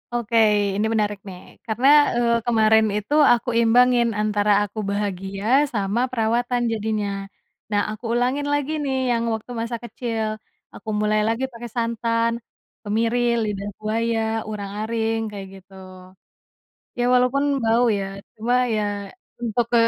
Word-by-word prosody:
Oke 235 -1 0 0.4
ini 210 +2 0
menarik 210 -2 0
nih 180 -1 -9 0.3
karena, 230 +4 +1 0.3
eee, 235 -1 +2
kemarin 220 -2 +4
itu 210 +7 -4 0.2
aku 240 +1 -1
imbangin 240 +1 +4
antara 210 -1 +1
aku 205 +1 -6
bahagia 195 0 -3 0.3
sama 205 +1 -1
perawatan 240 +1 0
jadinya, 215 -1 -2 0.6
nah 205 0 +2
aku 215 +2 -9
ulangin 255 +4 0
lagi 290 0 -1
nih 270 -2 -1 0.2
yang 230 -1 +1
waktu 220 +2 -6
masa 235 0 -3
kecil, 230 -1 -3 0.5
aku 220 - -9
mulai 215 0 +2
lagi 230 +3 -1
pakai 235 0 -8
santan, 230 0 0 0.5
kemiri, 225 +3 0 0.2
lidah 205 -2 -3
buaya, 225 +2 -1 0.3
urang-aring 215 +2 -2
kayak 200 -2 -7
gitu. 195 0 -16 1.3
Ya 240 - +1
walaupun 250 +3 +2 0.2
bau 230 +2 +3
ya 195 - -2 0.3
cuma 230 +3 -1 0.2
ya 215 - 0 0.6
untuk 235 0 0
ke 235 - +5
225 Hz, 135 wpm, -22 LUFS, 210-240 Hz, 1.3 s, ke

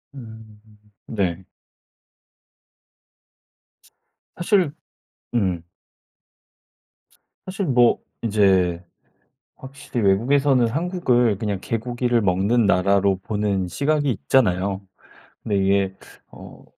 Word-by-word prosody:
음. 110 -4 -12 0.5
네. 95 -4 -2 2.9
사실 180 -4 +1 0.6
음. 95 -7 0 1.8
사실 190 +1 -3
뭐 125 -5 +3 0.2
이제 95 -6 +2 0.7
확실히 135 -2 -7
외국에서는 125 +5 +3
한국을 125 - +1
그냥 105 -3 -3
개고기를 120 +2 -1
먹는 100 +5 +2
나라로 100 0 +2
보는 100 -3 -1
시각이 145 - 0
있잖아요. 95 - 0 0.6
근데 105 -2 -1
이게 95 0 +1 0.4
어 - - -13
110 Hz, 165 characters per minute, -22 LUFS, 95-130 Hz, 2.9 s, 뭐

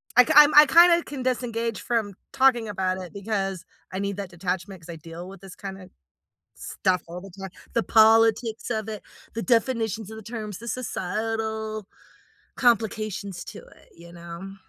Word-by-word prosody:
I 250 - +9
kin - - 0
I'm 300 0 +9
I 300 +1 +10
kinda 340 +3 +6
can 270 -3 -6
disengage 235 -3 -2
from 225 -5 -1 0.2
talking 260 -4 +3
about 185 -2 -1
it 180 - -10
because 195 -3 -3 0.3
I 190 - -4
need 200 0 -3
that 200 -2 -5
detachment, 185 +1 -4
'cause 165 - -15
I 170 - -6
deal 165 +3 -9
with 195 -1 -12
this 195 -2 -11
kinda 190 -1 -9 0.7
stuff 185 -1 -1
all 175 +2 -8
the 195 - -11
time. 195 -1 -7 0.2
The 230 - +1
politics 225 +1 +4
of 220 -1 -2
it, 215 -2 -6 0.3
the 225 - -3
definitions 225 -3 0
of 220 - -8
the 220 - -9
terms, 215 -3 -6
the 235 +2 -8
societal 220 -1 -3 0.7
complications 215 -5 0
to - - -9
it, - - -20
you 170 +1 -14
know? 170 +3 -9
215 Hz, 170 wpm, -25 LUFS, 190-230 Hz, 0.7 s, I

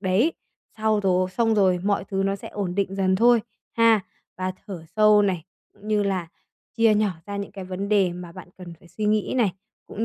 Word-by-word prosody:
đấy. 205 - +2 0.5
Sau 215 -1 +2
rồi 185 -1 +1
xong 225 +2 +1
rồi 190 -3 +3
mọi 200 -1 +1
thứ 195 -1 -2
nó 195 0 0
sẽ - - -10
ổn 190 -4 -4
định 195 -1 -1
dần 190 -1 +2
thôi, 235 +2 +5 0.4
ha. 230 -2 +5 0.4
Và 185 0 -2
thở 185 -5 -7
sâu 210 -1 +6
này, 180 -5 -1 0.3
cũng 210 - -13
như 210 -1 +2
là 190 -4 -2 0.5
chia 225 -2 +4
nhỏ 210 -1 +2 0.2
ra 200 0 -5
những 200 -1 -5
cái 195 -2 -7
vấn 190 +2 -5
đề 195 -4 +3
mà 175 -1 -9
bạn 185 0 -11
cần 175 -2 -9
phải 175 - -18
suy 180 +5 -5
nghĩ 215 +2 +1
này, 215 -7 +2 0.3
cũng 220 - -3
200 Hz, 215 wpm, -24 LUFS, 185-215 Hz, 0.5 s, sâu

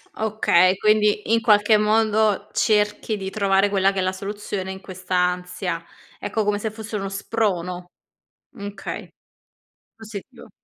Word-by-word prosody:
Okay, 195 -4 +3
quindi 210 +1 +2
in 230 - +3
qualche 210 -1 +5
modo 215 -1 +2
cerchi 210 0 +1
di 190 -1 -5
trovare 200 -1 +2
quella 195 -1 +3
che 195 - -8
è - - +2
la 185 - +1
soluzione 195 0 -5
in 190 - -7
questa 185 -1 -5
ansia. 180 -1 -1 0.4
Ecco, 215 +2 -1
come 205 0 0
se 220 - -2
fosse 220 0 -6
uno 195 -1 -3
sprono. 180 -3 -2 0.7
Okay. 200 -1 -6 0.9
Positivo. 220 +2 -10
205 Hz, 135 wpm, -23 LUFS, 190-215 Hz, 0.9 s, qualche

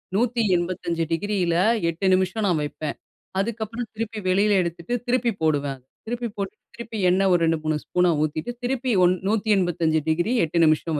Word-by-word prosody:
185° 185 -7 0
டிகிரில 180 0 0 0.3
8 170 +4 -3
நிமிஷம் 190 +3 +1
நான் 170 -5 +2
வைப்பேன். 145 0 -4 0.4
அதுக்கப்புறம் 225 +1 -3
திருப்பி 225 0 -4
வெளியில 205 +3 +3
எடுத்துட்டு, 170 +5 -4
திருப்பி 245 -1 +2
போடுவேன். 145 -4 0 0.2
திருப்பி 240 +1 -3
போட்டுட்டு, 200 +1 -5
திருப்பி 230 -1 -7
எண்ணெய் 190 +1 +3
ஒரு 175 - +3
2-3 155 -1 0
ஸ்பூன் 180 0 +1 0.2
ஊத்திட்டு 155 +8 -2
திருப்பி 255 0 -1
ஒ - - +7 0.2
185° 175 - +1
8 165 +1 -1
நிமிஷம் 155 0 +1
185 Hz, 135 wpm, -24 LUFS, 165-220 Hz, 0.4 s, ஒ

